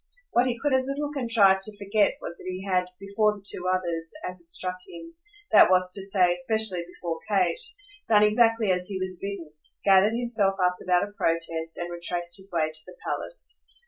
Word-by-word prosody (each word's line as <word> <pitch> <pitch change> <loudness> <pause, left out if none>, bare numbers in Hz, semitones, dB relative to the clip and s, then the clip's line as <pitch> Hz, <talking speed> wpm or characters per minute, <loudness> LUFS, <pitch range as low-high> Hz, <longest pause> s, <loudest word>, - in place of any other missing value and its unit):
What 245 +2 +3
he 240 -1 -2
could 290 +1 0
as 260 0 +2
little 290 +1 -3
contrive 225 -8 +3
to 205 +1 -8
forget 205 +1 +1
was 170 - -6
that - - -9
he 185 +1 -5
had, 185 -2 +1
before 200 +2 +1
the 200 -1 -16
two 180 -2 -2
others, 170 -3 -2 0.2
as 180 -1 -8
it 170 - -19
struck 185 +1 -2
him 330 - -11 0.4
that - - +7
was 185 0 +3
to 195 - -2
say 190 -2 +3
especially 185 0 +3
before 170 -2 -6
Kate 200 - +1 0.5
done 210 -2 +5
exactly 225 -1 +3
as 180 0 -1
he 195 -2 -4
was 185 -1 -5
bidden; 195 -6 -6 0.3
gathered 200 +3 +5
himself 220 -5 +1
up 180 0 +1
without 180 -1 +1
a - - -14
protest 165 -3 -1
and 175 0 -4
retraced 175 0 -2
his 195 0 -7
way 160 -2 0
to 155 0 -2
the 180 - -12
palace. - - -4
190 Hz, 200 wpm, -26 LUFS, 175-215 Hz, 0.5 s, that